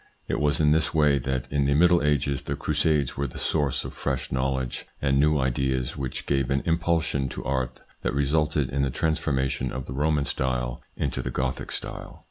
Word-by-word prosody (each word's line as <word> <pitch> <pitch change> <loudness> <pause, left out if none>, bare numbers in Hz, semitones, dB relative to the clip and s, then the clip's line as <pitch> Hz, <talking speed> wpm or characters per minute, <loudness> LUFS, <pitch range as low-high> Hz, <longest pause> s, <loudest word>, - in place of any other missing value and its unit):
It - - -1
was 75 0 +2
in 75 -1 +4
this 80 +1 +2
way 75 -2 +4
that 65 0 -2
in 70 -1 +2
the 70 0 +2
Middle 85 +2 +5
Ages 70 -1 +1
the - - -3
Crusades 75 -2 +1
were 70 +1 -1
the - - -9
source 75 -4 0
of - - -6
fresh 65 -3 -3
knowledge 65 -1 -1
and 70 -1 +2
new 75 +1 +4
ideas, 65 -1 0
which 65 -3 -4
gave 70 -2 +1
an 70 0 +1
impulsion 80 -5 +1
to - - -7
art 65 -2 -2 0.2
that - - -1
resulted 75 -1 +1
in 70 +1 0
the 70 - +1
transformation 70 -3 0
of 65 0 -4
the 65 - -6
Roman 75 +1 +1
style 60 -2 -2 0.2
into - - -1
the - - -3
Gothic 65 +1 -2
style. - - -6
70 Hz, 195 wpm, -26 LUFS, 65-75 Hz, 0.2 s, Middle